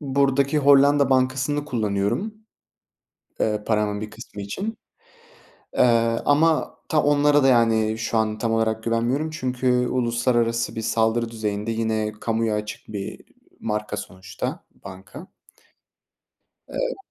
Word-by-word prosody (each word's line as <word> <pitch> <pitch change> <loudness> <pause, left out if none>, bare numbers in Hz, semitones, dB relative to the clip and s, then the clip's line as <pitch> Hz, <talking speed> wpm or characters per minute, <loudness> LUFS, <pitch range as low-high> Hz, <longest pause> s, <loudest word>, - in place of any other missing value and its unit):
buradaki 140 0 +1
Hollanda 140 0 +5
bankasını 130 +3 +1
kullanıyorum. 110 - -1 1.1
Eee, 105 -1 0
paramın 105 -1 0
bir 105 - -5
kısmı 105 - -10
için, 200 - -5 1.0
eee, - - +4 0.4
ama 155 +2 +2
ta 155 - +2
onlara 145 0 +4
da - - +5
yani 110 -3 +3
şu 115 0 -1
an 110 -1 0
tam 115 0 -1
olarak 110 0 0
güvenmiyorum, 120 +7 0
çünkü 125 -3 0
uluslararası 120 -1 0
bir 115 - -3
saldırı 115 +1 +1
düzeyinde 105 0 -3
yine 110 -1 -1
kamuya 115 -1 0
açık 105 0 -6
bir, 105 - -5
iii, 100 - -7 0.3
marka 105 -1 -3
sonuçta 95 0 -6 0.2
banka. 100 - -10 1.4
Eee - - -2
115 Hz, 120 wpm, -23 LUFS, 110-140 Hz, 1.4 s, Hollanda